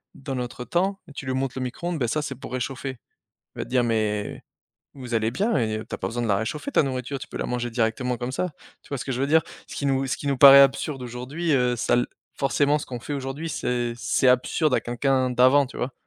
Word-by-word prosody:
dans 135 Hz, -1 st, -5 dB
notre 125 Hz, -1 st, -4 dB
temps 195 Hz, +3 st, 0 dB
et -, -, -13 dB
tu 140 Hz, -, -7 dB
lui 130 Hz, -, -1 dB
montres 130 Hz, 0 st, -2 dB
le 130 Hz, -, -2 dB
micro-ondes, 165 Hz, +6 st, -3 dB
bah 120 Hz, -, +1 dB
ça, 150 Hz, +6 st, 0 dB
c'est 135 Hz, -2 st, -4 dB
pour 125 Hz, -, -9 dB
réchauffer. 130 Hz, +1 st, -4 dB, 0.6 s
Il -, -, -11 dB
va -, -, -1 dB
dire, 125 Hz, -1 st, +1 dB
mais 105 Hz, -2 st, -1 dB, 0.5 s
vous 125 Hz, -3 st, -6 dB
allez 110 Hz, 0 st, +1 dB
bien 205 Hz, -, 0 dB
et 110 Hz, -2 st, -1 dB
tu -, -, -5 dB
as -, -, -5 dB
pas -, -, -2 dB
besoin 120 Hz, +1 st, -3 dB
de 115 Hz, -, -1 dB
la 100 Hz, -, +3 dB
réchauffer 150 Hz, -, -3 dB
ta -, -, +5 dB
nourriture, 130 Hz, 0 st, -3 dB
tu -, -, -9 dB
peux -, -, -9 dB
la -, -, -2 dB
manger 120 Hz, -1 st, -2 dB
directement 120 Hz, +2 st, 0 dB
comme 125 Hz, +1 st, -4 dB
ça. 180 Hz, +6 st, -1 dB, 0.3 s
Tu -, -, -19 dB
vois 140 Hz, -, -3 dB
ce 130 Hz, -, -5 dB
que 135 Hz, -, -3 dB
je 125 Hz, -, -2 dB
veux 140 Hz, -, +2 dB
dire? 160 Hz, +2 st, +4 dB, 0.3 s
Ce -, -, -8 dB
qui 140 Hz, -, -2 dB
nous 135 Hz, 0 st, +1 dB
ce 130 Hz, -, -1 dB
qui 145 Hz, -, -8 dB
nous 140 Hz, -1 st, +1 dB
paraît 140 Hz, +1 st, +10 dB
absurde 135 Hz, 0 st, +2 dB
aujourd'hui, 130 Hz, +7 st, -3 dB
heu, 125 Hz, -2 st, +2 dB
ça 120 Hz, -, +1 dB
l 120 Hz, -, +2 dB, 0.3 s
forcément, 145 Hz, +2 st, +2 dB
ce -, -, -7 dB
qu'on 125 Hz, -2 st, -6 dB
fait 145 Hz, -, -6 dB
aujourd'hui, 140 Hz, +4 st, -4 dB
c'est 120 Hz, -4 st, -1 dB
c'est 125 Hz, +2 st, +2 dB
absurde 130 Hz, +3 st, +2 dB
à -, -, +2 dB
quelqu'un 130 Hz, +1 st, 0 dB
d'avant, 130 Hz, +3 st, +5 dB
tu -, -, -12 dB
vois? 130 Hz, +1 st, -3 dB
130 Hz, 260 wpm, -25 LUFS, 120-140 Hz, 0.6 s, paraît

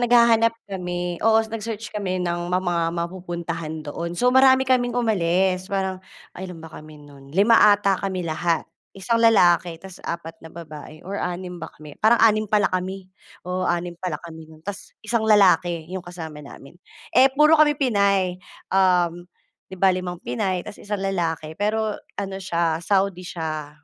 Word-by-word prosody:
naghahanap 235 Hz, -1 st, +4 dB
kami, 180 Hz, -2 st, -4 dB
oo, 220 Hz, 0 st, +4 dB
nag-search 220 Hz, -1 st, -6 dB
kami 195 Hz, -3 st, -2 dB
ng 175 Hz, 0 st, -2 dB
ma 180 Hz, +1 st, +1 dB
mga 175 Hz, -2 st, 0 dB
mapupuntahan 170 Hz, -3 st, -5 dB
doon. 170 Hz, +4 st, -5 dB
So, 250 Hz, +6 st, +2 dB
marami 260 Hz, 0 st, +6 dB
kaming 245 Hz, -2 st, +1 dB
umalis 185 Hz, -4 st, +1 dB
parang 190 Hz, -1 st, -2 dB, 0.3 s
ay 190 Hz, +1 st, -7 dB
ilan 180 Hz, -2 st, -9 dB
ba 165 Hz, -, -10 dB
kami 155 Hz, 0 st, -11 dB
no'n, 140 Hz, -1 st, -15 dB
5 200 Hz, +8 st, +4 dB, 0.2 s
ata 200 Hz, -2 st, 0 dB
kami 190 Hz, -2 st, -3 dB
lahat, 165 Hz, +1 st, 0 dB, 0.3 s
1 230 Hz, +4 st, 0 dB
lalaki 175 Hz, -6 st, +4 dB
tapos 190 Hz, +1 st, -12 dB
4 170 Hz, -1 st, -5 dB
na 165 Hz, -, -10 dB
babae 155 Hz, -2 st, -11 dB
or 195 Hz, -, -5 dB
6 180 Hz, 0 st, -5 dB
ba 160 Hz, -, -6 dB
kami, 150 Hz, -2 st, -13 dB
parang 225 Hz, +2 st, +5 dB
6 215 Hz, -1 st, +3 dB
pala 210 Hz, -1 st, +3 dB
kami, 185 Hz, +1 st, -3 dB, 0.4 s
oo 180 Hz, +1 st, -2 dB
6 175 Hz, 0 st, -1 dB
pala 175 Hz, -5 st, -3 dB
kami 160 Hz, -2 st, -11 dB
no'n, 155 Hz, 0 st, -16 dB
tas 205 Hz, 0 st, -6 dB
isang 230 Hz, +1 st, 0 dB
lalaki, 180 Hz, -6 st, +3 dB
'yong 185 Hz, +2 st, -6 dB
kasama 160 Hz, -4 st, -8 dB
namin. 140 Hz, +1 st, -13 dB, 0.4 s
Eh, 265 Hz, +2 st, +6 dB
puro 300 Hz, +4 st, +5 dB
kami 300 Hz, -2 st, +4 dB
Pinay, 200 Hz, -7 st, +1 dB, 0.3 s
um, 180 Hz, -2 st, +2 dB, 0.5 s
'di 190 Hz, -, -9 dB
ba, 190 Hz, 0 st, +4 dB
5 180 Hz, -1 st, -4 dB
Pinay 180 Hz, +8 st, -2 dB
'tas 210 Hz, -, -10 dB
isang 205 Hz, 0 st, -3 dB
lalaki, 170 Hz, -5 st, -2 dB
pero 215 Hz, +2 st, -1 dB, 0.2 s
ano 195 Hz, -1 st, -4 dB
siya 170 Hz, -2 st, -1 dB
Saudi 195 Hz, -1 st, +1 dB
siya, 155 Hz, -4 st, -5 dB
185 Hz, 165 wpm, -23 LUFS, 170-205 Hz, 0.5 s, marami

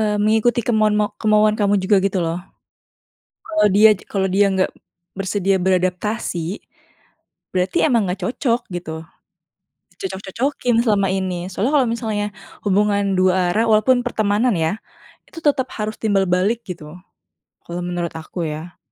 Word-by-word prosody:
eee, 210 Hz, -1 st, +1 dB
mengikuti 220 Hz, +3 st, +2 dB
kemauan 215 Hz, -3 st, +3 dB
ma 210 Hz, 0 st, 0 dB
kemauan 215 Hz, -1 st, +4 dB
kamu 205 Hz, -1 st, +2 dB
juga 195 Hz, +2 st, +3 dB
gitu 195 Hz, -1 st, 0 dB
loh. 165 Hz, +2 st, -2 dB, 1.0 s
Kalau 320 Hz, -8 st, +2 dB
dia 215 Hz, +2 st, +7 dB, 0.2 s
kalau 195 Hz, -2 st, -1 dB
dia 200 Hz, +2 st, +3 dB
nggak 190 Hz, 0 st, +1 dB, 0.5 s
bersedia 195 Hz, 0 st, 0 dB
beradaptasi, 185 Hz, 0 st, -1 dB, 0.9 s
berarti 185 Hz, 0 st, -1 dB
emang 230 Hz, -8 st, +2 dB
nggak 190 Hz, +2 st, -4 dB
cocok, 240 Hz, +2 st, 0 dB
gitu. 160 Hz, -2 st, -6 dB, 0.9 s
Dicocok-cocokin 245 Hz, -, -1 dB
selama 200 Hz, -4 st, +2 dB
ini. 185 Hz, -2 st, -2 dB
Soalnya 215 Hz, +9 st, -1 dB
kalau 265 Hz, -4 st, +4 dB
misalnya 215 Hz, -3 st, -2 dB, 0.3 s
hubungan 200 Hz, 0 st, +2 dB
2 185 Hz, -1 st, +3 dB
arah 220 Hz, +4 st, +2 dB
walaupun 245 Hz, +4 st, +4 dB
pertemanan 215 Hz, +1 st, +1 dB
ya, 160 Hz, +4 st, 0 dB, 0.5 s
itu -, -, -9 dB
tetap 275 Hz, -3 st, +2 dB
harus 215 Hz, 0 st, -3 dB
timbal 200 Hz, -3 st, +2 dB
balik, 195 Hz, +6 st, +1 dB
gitu. 155 Hz, -3 st, -8 dB, 0.7 s
Kalau 175 Hz, +1 st, -5 dB
menurut 175 Hz, -1 st, -3 dB
aku 160 Hz, +1 st, -5 dB
ya. 155 Hz, +3 st, -7 dB
205 Hz, 135 wpm, -20 LUFS, 185-220 Hz, 1.0 s, dia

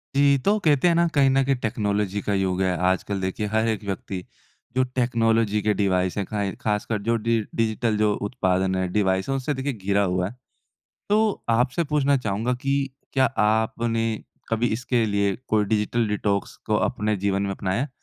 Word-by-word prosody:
जी। 140 Hz, 0 st, +5 dB
तो 210 Hz, +1 st, +4 dB
कहते 150 Hz, +2 st, +4 dB
हैं 170 Hz, -, +4 dB
ना, 170 Hz, 0 st, +3 dB
कहीं 140 Hz, -4 st, +3 dB
न 135 Hz, +1 st, +3 dB
कहीं 135 Hz, 0 st, +2 dB
टेक्नोलॉजी 105 Hz, -4 st, -1 dB
का 100 Hz, -, -1 dB
युग 95 Hz, -1 st, 0 dB
है। 95 Hz, -1 st, +1 dB, 0.2 s
आजकल 95 Hz, +1 st, -2 dB
देखिए 95 Hz, +3 st, -2 dB
हर 110 Hz, +2 st, +1 dB
एक 110 Hz, -2 st, -1 dB
व्यक्ति 95 Hz, -1 st, -4 dB, 0.5 s
जो 130 Hz, -, +3 dB
टेक्नोलॉज़ी 115 Hz, -4 st, +1 dB
के 105 Hz, +1 st, +2 dB
डिवाइस 95 Hz, -2 st, 0 dB
हैं 100 Hz, -, -1 dB
खाय 100 Hz, 0 st, -2 dB
खास 105 Hz, -1 st, 0 dB
कर 110 Hz, -2 st, -2 dB
जो 115 Hz, +3 st, +1 dB
डि 115 Hz, +1 st, +1 dB, 0.2 s
डिजिटल 110 Hz, -1 st, 0 dB
जो 105 Hz, 0 st, +2 dB
उत्पादन 95 Hz, -5 st, 0 dB
हैं 95 Hz, -1 st, -1 dB
डिवाइस 95 Hz, 0 st, +1 dB
है -, -, +1 dB
उनसे 135 Hz, +2 st, -1 dB
देखिए 135 Hz, +1 st, -2 dB
घिरा 100 Hz, -2 st, 0 dB
हुआ 90 Hz, -1 st, 0 dB
है। 120 Hz, -, -13 dB, 0.7 s
तो 215 Hz, 0 st, +2 dB
आपसे 125 Hz, +7 st, +2 dB
पूछना 145 Hz, -2 st, +2 dB
चाहूँगा 110 Hz, +1 st, -1 dB
कि 135 Hz, 0 st, +1 dB, 0.4 s
क्या 130 Hz, -1 st, +4 dB, 0.2 s
आपने 115 Hz, +1 st, 0 dB, 0.4 s
कभी 115 Hz, +1 st, +1 dB
इसके 120 Hz, 0 st, 0 dB
लिए 100 Hz, -2 st, +1 dB
कोई 105 Hz, -1 st, +2 dB
डिजिटल 110 Hz, +2 st, 0 dB
डिटॉक्स 100 Hz, -1 st, -1 dB
को -, -, +1 dB
अपने 105 Hz, +1 st, 0 dB
जीवन 100 Hz, 0 st, 0 dB
में 100 Hz, -1 st, -1 dB
अपनाया 95 Hz, +4 st, -1 dB
है? 145 Hz, -, -3 dB
110 Hz, 190 wpm, -24 LUFS, 100-125 Hz, 0.7 s, जी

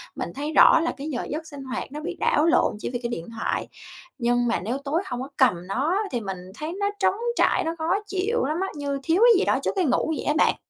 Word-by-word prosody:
Mình -, -, -4 dB
thấy 295 Hz, +3 st, -3 dB
rõ 315 Hz, -, +7 dB
là 330 Hz, +1 st, 0 dB
cái 285 Hz, +2 st, -6 dB
giờ 245 Hz, -5 st, -3 dB
giấc 315 Hz, +2 st, -4 dB
sinh 285 Hz, -3 st, -9 dB
hoạt 260 Hz, 0 st, -5 dB
nó 295 Hz, -, -6 dB
bị 310 Hz, -, -5 dB
đảo 300 Hz, -, +3 dB
lộn 330 Hz, -9 st, +3 dB
chỉ -, -, -4 dB
vì 245 Hz, -1 st, -3 dB
cái 235 Hz, -, -1 dB
điện 170 Hz, -8 st, -5 dB
thoại. -, -, -1 dB, 0.5 s
Nhưng 240 Hz, 0 st, +2 dB
mà 230 Hz, -, +1 dB
nếu 235 Hz, +7 st, -2 dB
tối 280 Hz, +5 st, -1 dB
hông 250 Hz, -7 st, -4 dB
có 270 Hz, -, -6 dB
cầm 180 Hz, -9 st, +2 dB
nó 290 Hz, -, 0 dB
thì 245 Hz, -, -1 dB
mình 195 Hz, -2 st, -4 dB, 0.2 s
thấy 310 Hz, +2 st, -4 dB
nó 405 Hz, 0 st, +1 dB
trống -, -, +3 dB, 0.2 s
trải, -, -, +3 dB
nó 325 Hz, +1 st, -2 dB
khó 325 Hz, +4 st, +1 dB
chịu 395 Hz, -, 0 dB
lắm 305 Hz, +3 st, -1 dB
á, 385 Hz, -, 0 dB
như 280 Hz, -1 st, -3 dB
thiếu 340 Hz, +5 st, +2 dB
cái 460 Hz, -6 st, +6 dB
gì -, -, +1 dB
đó -, -, +2 dB
trước -, -, +1 dB
cái 375 Hz, -3 st, +2 dB
ngủ 295 Hz, +4 st, +1 dB
vậy -, -, -5 dB
á 300 Hz, -, +2 dB
bạn. -, -, +4 dB
290 Hz, 270 wpm, -24 LUFS, 245-330 Hz, 0.5 s, rõ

